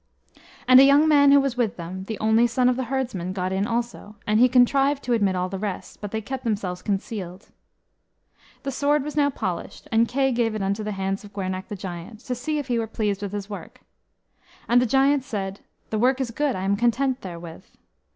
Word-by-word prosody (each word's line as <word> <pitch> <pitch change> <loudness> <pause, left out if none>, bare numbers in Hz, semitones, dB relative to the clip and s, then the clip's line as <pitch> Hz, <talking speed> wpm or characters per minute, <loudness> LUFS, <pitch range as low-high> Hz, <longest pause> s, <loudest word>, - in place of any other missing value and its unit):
And 255 0 +9
a - - +9
young 285 +3 +6
man 285 -2 +6
who 280 - +7
was 275 -2 -1
with 240 -4 -1
them, 185 +2 -6
the 220 +1 -5
only 220 +2 +3
son 245 +2 +1
of 250 - +3
the 260 0 -2
herdsman, 235 -9 -3
got 185 -1 -2
in 195 +2 0
also; 235 -2 -4
and 210 +1 +2
he 250 +1 +6
contrived 275 +3 +3
to 245 - 0
admit 200 -5 +2
all 180 0 -1
the 190 +1 -5
rest, 200 -2 -5
but 205 - -4
they 220 +2 -3
kept 260 +5 -6
themselves 200 -6 -2
concealed. 195 -2 -4 1.1
The 275 - -2
sword 285 +2 +1
was 300 +1 -6
now 290 -1 +3
polished, 185 -10 -5
and 230 +1 +3
Kay 270 +2 +1
gave 235 -2 0
it 210 - -2
unto 200 +2 -1
the 210 0 -3
hand 195 +1 -3
of 205 0 -13
Gwernach 190 -1 -4
the 210 - -5
Giant, 185 +3 -8
to 255 - -4
see 300 +6 -2
if 290 - -2
he 240 -2 0
were 225 - -2
pleased 210 -2 -2
with 200 -2 -4
his 205 -1 -5
work. 205 -1 -9 0.9
And 245 +1 +5
the 250 - +1
giant 270 +3 +3
said, 195 -5 -4 0.3
"The 215 - 0
work 255 +3 +3
is 255 -3 -2
good; 290 +3 0
I 185 - -4
am 200 +1 +1
content 250 +3 +1
therewith." 170 -3 -9
225 Hz, 220 wpm, -24 LUFS, 195-260 Hz, 1.1 s, And